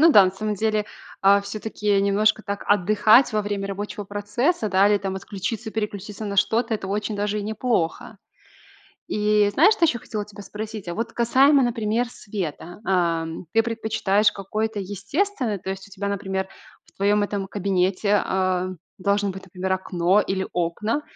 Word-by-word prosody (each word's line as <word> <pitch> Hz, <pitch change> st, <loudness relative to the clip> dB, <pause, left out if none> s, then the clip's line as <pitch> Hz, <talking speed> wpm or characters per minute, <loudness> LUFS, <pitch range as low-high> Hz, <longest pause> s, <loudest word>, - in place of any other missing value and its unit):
Ну 330 Hz, +1 st, +7 dB
да, 200 Hz, -2 st, +8 dB
на 185 Hz, -, +1 dB
самом 210 Hz, +3 st, -3 dB
деле, 215 Hz, +1 st, 0 dB, 0.4 s
а, 200 Hz, +1 st, +5 dB
всё-таки 205 Hz, 0 st, -1 dB
немножко 205 Hz, +2 st, +2 dB
так 200 Hz, -1 st, -4 dB
отдыхать 210 Hz, +5 st, +5 dB
во 215 Hz, -1 st, +1 dB
время 200 Hz, -1 st, -3 dB
рабочего 205 Hz, +1 st, -5 dB
процесса, 210 Hz, -, -1 dB
да, 195 Hz, +1 st, +4 dB
или 205 Hz, -1 st, +3 dB
там 195 Hz, -1 st, -3 dB
отключиться, 210 Hz, +3 st, -4 dB
переключиться 210 Hz, -1 st, -4 dB
на 200 Hz, -1 st, -4 dB
что-то- 225 Hz, +3 st, +2 dB
это 195 Hz, -2 st, -5 dB
очень 210 Hz, +1 st, -2 dB
даже 205 Hz, +1 st, -1 dB
и -, -, -3 dB
неплохо. 215 Hz, -2 st, -2 dB, 0.9 s
И 210 Hz, -1 st, +2 dB
знаешь, 355 Hz, -, +6 dB
что 345 Hz, -, -2 dB
еще 240 Hz, -7 st, 0 dB
хотела 210 Hz, -1 st, -4 dB
тебя 205 Hz, 0 st, -12 dB
спросить? 210 Hz, -1 st, -7 dB
А 175 Hz, -, -3 dB
вот 230 Hz, +1 st, -3 dB
касаемо, 270 Hz, +4 st, +4 dB
например, 235 Hz, 0 st, 0 dB
света. 180 Hz, -6 st, -6 dB
Ам, 170 Hz, -2 st, 0 dB
ты 225 Hz, -, +5 dB
предпочитаешь 220 Hz, -2 st, +1 dB
какое-то 215 Hz, +2 st, -3 dB
естественное? 210 Hz, -, -2 dB
То 190 Hz, -, -6 dB
есть 190 Hz, +1 st, -5 dB
у -, -, -21 dB
тебя, 200 Hz, +1 st, -4 dB
например, 190 Hz, -1 st, -2 dB, 0.4 s
в -, -, -25 dB
твоем 205 Hz, +1 st, +2 dB
этом 200 Hz, -1 st, -3 dB
кабинете, 195 Hz, +1 st, +1 dB
а, 185 Hz, -1 st, 0 dB, 0.3 s
должно 200 Hz, +1 st, +1 dB
быть, 190 Hz, 0 st, -9 dB
например, 190 Hz, +1 st, -2 dB
окно 185 Hz, +1 st, +2 dB
или 190 Hz, -1 st, -2 dB
окна, 180 Hz, -, -1 dB
205 Hz, 165 wpm, -23 LUFS, 195-215 Hz, 0.9 s, да